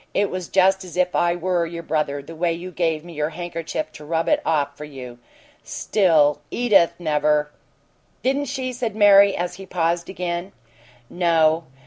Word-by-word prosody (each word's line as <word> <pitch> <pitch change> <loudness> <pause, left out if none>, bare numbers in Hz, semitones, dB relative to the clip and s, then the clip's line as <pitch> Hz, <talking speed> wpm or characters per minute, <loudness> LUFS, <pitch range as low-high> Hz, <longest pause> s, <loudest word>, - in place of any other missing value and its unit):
It 200 0 +1
was 185 -2 -4
just 190 0 +3
as 180 -1 -10
if 180 0 +1
I 175 0 +2
were 175 0 0
your 170 0 -6
brother 150 -3 -2
the 165 +3 -11
way 170 +1 0
you 175 +2 -7
gave 165 -3 -1
me 175 - -10
your 150 0 -1
handkerchief 175 - -5
to 150 - -12
rub 165 +2 -1
it - - +2
off 145 -3 0
for 150 - -9
you. 130 -5 -10 0.4
Still, 160 -8 +2
Edith 210 -8 +3
never 150 -2 +1 0.3
" - - -40
"Didn't 275 +2 +1
she?" 260 -1 -4
said 235 -3 -3
Mary, 200 -1 +6
as 175 0 -3
he 195 0 -10
paused 170 -1 -1
again. 180 0 -4 0.5
"No. 165 -1 +2
170 Hz, 175 wpm, -22 LUFS, 155-190 Hz, 0.5 s, Mary